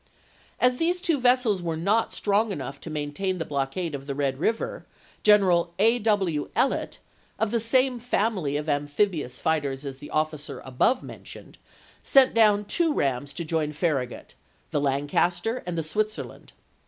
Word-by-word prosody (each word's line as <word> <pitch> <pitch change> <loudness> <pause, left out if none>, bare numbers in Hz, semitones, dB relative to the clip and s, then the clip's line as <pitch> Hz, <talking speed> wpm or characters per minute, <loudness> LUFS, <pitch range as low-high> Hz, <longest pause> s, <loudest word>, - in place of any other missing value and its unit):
As 250 0 +3
these 350 +4 +1
two 335 -5 +1
vessels 245 -6 +3
were 165 -2 -2
not 205 +7 +1
strong 210 +1 +1
enough 140 -6 -5
to - - -8
main 145 -1 -4
tain 190 +3 -1
the 165 - -3
blockade 145 +4 -2
of 140 0 -6
the 140 - -3
Red 135 -2 -1
River, 230 - -1 0.4
General 180 -5 +4
A. 230 +4 +4
W. 195 -9 0
Ellet, 270 - 0 0.4
of 220 -2 0
the 235 - +1
same 255 +2 +2
family 205 - 0
of 150 +1 -4
amphibious 145 0 -1
fighters 145 -3 -1
as 135 -1 -6
the 145 - -11
officer 155 -1 -2
above 130 - +1
mentioned, - - -11 0.4
sent 270 -1 +5
down 210 -2 +4
two 330 +9 +1
rams 140 - -1
to 170 - -5
join 155 -1 -1
Farragut, 145 -6 -2 0.4
the 145 - 0
Lancaster 145 - 0
and 175 -1 -3
the 165 - -1
Switzerland. 215 +7 -4
175 Hz, 160 wpm, -26 LUFS, 145-225 Hz, 0.4 s, sent